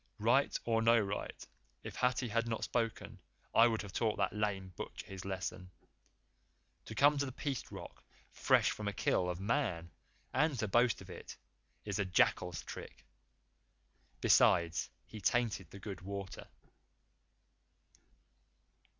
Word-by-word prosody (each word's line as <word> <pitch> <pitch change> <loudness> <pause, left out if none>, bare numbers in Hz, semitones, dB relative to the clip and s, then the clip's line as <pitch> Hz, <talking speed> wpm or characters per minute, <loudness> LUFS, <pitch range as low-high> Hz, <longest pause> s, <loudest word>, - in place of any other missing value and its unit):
Right 120 +6 +3
or 115 -1 +2
no 115 +1 +5
right, 100 -1 -4 0.4
if - - -7
Hathi 125 0 +1
had 115 +2 0
not 115 -1 -2
spoken 110 -4 -2 0.3
I 115 - +7
would 110 -3 -1
have 100 -2 -9
taught 110 -3 0
that 100 -1 0
lame 100 -3 -2
butcher - - -7
his 95 -1 -8
lesson. 95 -1 -4 1.2
To 110 - -8
come 145 +5 +5
to 140 - +1
the - - -5
Peace 135 0 -4
Rock - - -9 0.3
fresh - - +3
from 105 - -5
a 100 - -1
kill 90 -2 +1
of 90 0 -3
Man 100 - -1 0.4
and 150 0 +2
to 110 - -1
boast 120 +2 +3
of - - -10
it - - -9 0.5
is 100 -2 -2
a 100 - +1
jackal's 90 -3 +2
trick. - - -9 1.2
Besides, 85 -1 +4 0.2
he 110 - -10
tainted 110 -6 +1
the - - -10
good 100 -1 -7
water." 100 0 -6
105 Hz, 140 wpm, -34 LUFS, 95-115 Hz, 1.2 s, I